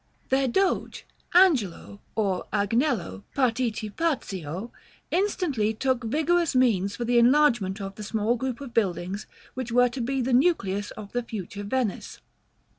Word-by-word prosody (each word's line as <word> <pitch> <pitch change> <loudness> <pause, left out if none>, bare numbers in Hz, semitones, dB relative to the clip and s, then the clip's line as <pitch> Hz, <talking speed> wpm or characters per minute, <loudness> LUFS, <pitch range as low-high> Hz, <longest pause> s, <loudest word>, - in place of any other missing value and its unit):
Their 265 0 +2
Doge, 375 +10 0 0.3
Angelo 245 - +3
or 195 -4 -1
Agnello 205 - 0
Participazio, 225 - -1 0.4
instantly 320 - 0
took 255 0 0
vigorous 315 +5 +1
means 210 -6 +2
for 240 - -3
the 240 0 +4
enlargement 235 -6 +3
of 195 -1 -5
the 210 - -8
small 220 +2 0
group 250 0 -3
of 265 -4 -8
buildings 195 -1 -1 0.3
which 250 -2 -5
were 245 +1 +4
to 250 +1 -5
be 265 +3 -1
the 255 0 0
nucleus 210 - +2
of 205 -2 -9
the 245 - -1
future 205 -3 -6
Venice. 225 0 -2
235 Hz, 135 wpm, -26 LUFS, 205-265 Hz, 0.4 s, the